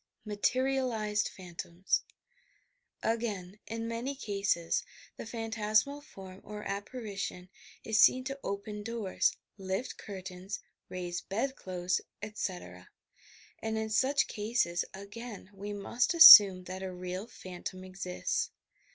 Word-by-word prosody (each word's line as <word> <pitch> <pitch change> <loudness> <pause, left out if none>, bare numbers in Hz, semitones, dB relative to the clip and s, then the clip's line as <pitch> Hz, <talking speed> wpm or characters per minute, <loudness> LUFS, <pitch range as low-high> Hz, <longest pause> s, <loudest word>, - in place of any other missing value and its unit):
MATERIALIZED 225 -1 0
PHANTOMS 175 0 -2 1.0
Again, 210 -4 -2
in 230 0 -4
many 235 +4 -3
cases, 200 -8 0 0.3
the - - -8
phantasmal 225 +4 0
form 190 -9 -12
or 210 0 -7
appari 205 +2 -5
tion 180 -2 -5 0.3
is 220 -1 +3
seen 255 - +6
to 275 +1 -5
open 205 +1 -4
doors, 220 -3 0 0.2
lift 190 +6 -3
curlains, 190 0 -7 0.3
raise 175 -1 -4
bed 255 +7 -2
clothes, 180 -1 -2 0.2
etc., 180 - -5 0.7
and 220 0 -2
in 220 0 -2
such 265 +6 +3
cases, 210 -5 0
again, 200 +1 -9
we 200 +1 -6
must 235 - 0
assume 205 - +11
that 185 +1 -7
a 190 -1 -4
real 180 +3 -5
phantom 185 -3 -8
exists. 185 -1 -2
205 Hz, 115 wpm, -31 LUFS, 185-230 Hz, 1.0 s, assume